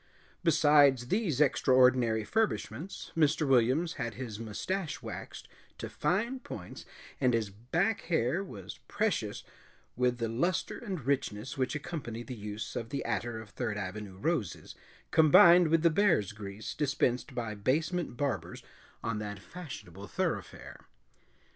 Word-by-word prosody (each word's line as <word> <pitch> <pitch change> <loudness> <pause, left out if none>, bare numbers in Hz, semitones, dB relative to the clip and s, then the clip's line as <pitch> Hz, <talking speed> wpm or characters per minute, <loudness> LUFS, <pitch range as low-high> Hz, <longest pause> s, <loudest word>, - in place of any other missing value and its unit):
Besides 145 -6 +5
these 190 - 0
extraordinary 125 -5 +4
furbishments, 195 - -2
Mr. 155 -1 +2
Williams 135 +6 +3
had 115 -3 -3
his 115 -4 -6
mustache 150 - -3
waxed - - -7 0.3
to - - -5
fine 235 +8 0
points - - -9 0.3
and 125 -3 +3
his 110 -3 -1
back 165 - 0
hair 160 +2 +1
was 95 - -9
precious - - -1 0.5
with 125 0 +1
the 115 -1 -1
luster 165 +11 -1
and 190 - -5
richness 130 -4 -1
which 130 +1 -1
accompany 145 -7 -5
the 130 - -7
use 105 -1 -6
of 115 - -4
the 140 - -3
attar 115 -1 -2
of 110 -2 -10
Third 115 -5 -3
Avenue 100 0 -6
roses 130 - -2 0.4
combined 170 +2 +7
with 165 +1 +2
the 170 - +5
bear's 170 - +3
grease 105 0 -7
dispensed 135 -2 0
by 115 -3 -3
basement 155 - -1
barbers 140 -1 -3 0.4
on 115 -2 -1
that 105 -1 -5
fashionable 100 - -9
thoroughfare. - - -4
130 Hz, 135 wpm, -31 LUFS, 110-165 Hz, 0.5 s, combined